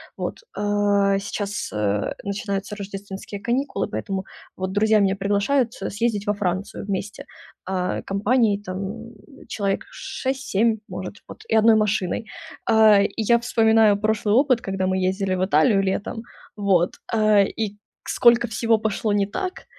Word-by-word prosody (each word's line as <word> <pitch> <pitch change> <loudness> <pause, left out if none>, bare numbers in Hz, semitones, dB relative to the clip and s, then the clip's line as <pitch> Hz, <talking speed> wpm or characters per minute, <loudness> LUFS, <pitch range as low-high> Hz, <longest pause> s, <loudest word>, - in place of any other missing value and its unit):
Вот. - - -4 0.2
А 205 -1 +2
сейчас, 200 0 -4
э, 105 -1 -1
начинаются 200 0 -3
рождественские 200 0 -7
каникулы, 255 +6 -1
поэтому 190 - -4 0.3
вот 185 0 -3
друзья 215 +1 +3
меня 195 -1 +2
приглашают 205 +6 +1
съездить 205 +1 -2
во 205 - +2
Францию 190 +1 -3
вместе, 200 +1 -4 0.4
а 185 -1 -2
компанией 205 +1 +1
там 205 +4 -6 0.3
человек 200 -2 -2
6-7 235 -4 -1
может 185 +1 -6
вот, - - -11
и - - +2
1 220 0 +6
машиной. 210 -1 0 0.4
А 220 -2 +6
и 200 - +1
я 235 +2 +3
вспоминаю 225 -3 +4
прошлый 215 0 +1
опыт, 260 -3 +3
когда 195 -1 -2
мы 185 0 0
ездили 190 0 -1
в 185 0 0
Италию 190 +3 +3
летом, 195 +3 -2 0.3
вот, 195 -4 +1 0.2
э, 215 -2 +4
и 210 -2 -4 0.3
сколько 240 0 +4
всего 225 0 +1
пошло 215 0 -1
не 205 -1 +2
так. 365 - -5
205 Hz, 140 wpm, -23 LUFS, 195-220 Hz, 0.4 s, 1